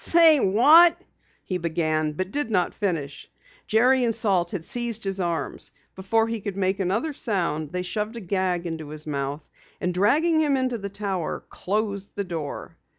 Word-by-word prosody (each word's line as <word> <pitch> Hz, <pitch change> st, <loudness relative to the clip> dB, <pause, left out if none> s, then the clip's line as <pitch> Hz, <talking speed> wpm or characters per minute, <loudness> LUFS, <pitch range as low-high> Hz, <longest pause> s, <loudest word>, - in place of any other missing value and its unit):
"Say, 330 Hz, -3 st, +8 dB
what 300 Hz, -, +6 dB, 0.2 s
" -, -, -39 dB
he 185 Hz, -1 st, -3 dB
began 155 Hz, -2 st, -1 dB
but 185 Hz, +5 st, -4 dB
did 290 Hz, -2 st, -2 dB
not 185 Hz, -5 st, 0 dB
finish. 165 Hz, -9 st, -4 dB, 0.4 s
Jerry 250 Hz, +4 st, +3 dB
and 230 Hz, -2 st, 0 dB
Salt 185 Hz, -6 st, +1 dB
had 175 Hz, -4 st, -5 dB
seized 235 Hz, -2 st, -2 dB
his 195 Hz, -1 st, -2 dB
arms. 170 Hz, -5 st, -2 dB, 0.2 s
Before 225 Hz, +4 st, 0 dB
he 230 Hz, -1 st, -4 dB
could 200 Hz, -1 st, -5 dB
make 190 Hz, 0 st, 0 dB
another 205 Hz, -, -1 dB
sound, 170 Hz, -, -2 dB
they 180 Hz, 0 st, -3 dB
shoved 210 Hz, +5 st, -3 dB
a -, -, -5 dB
gag 185 Hz, -3 st, -1 dB
into 160 Hz, -3 st, -6 dB
his 155 Hz, 0 st, -6 dB
mouth, 145 Hz, 0 st, -4 dB, 0.3 s
and 180 Hz, -, -2 dB
dragging 305 Hz, -, +2 dB
him 290 Hz, -3 st, +2 dB
into 255 Hz, -3 st, -1 dB
the 200 Hz, 0 st, -5 dB
Tower, 195 Hz, -4 st, -4 dB
closed 200 Hz, 0 st, -3 dB
the 200 Hz, -, -2 dB
door. 165 Hz, -6 st, -6 dB
195 Hz, 175 wpm, -24 LUFS, 170-230 Hz, 0.4 s, Say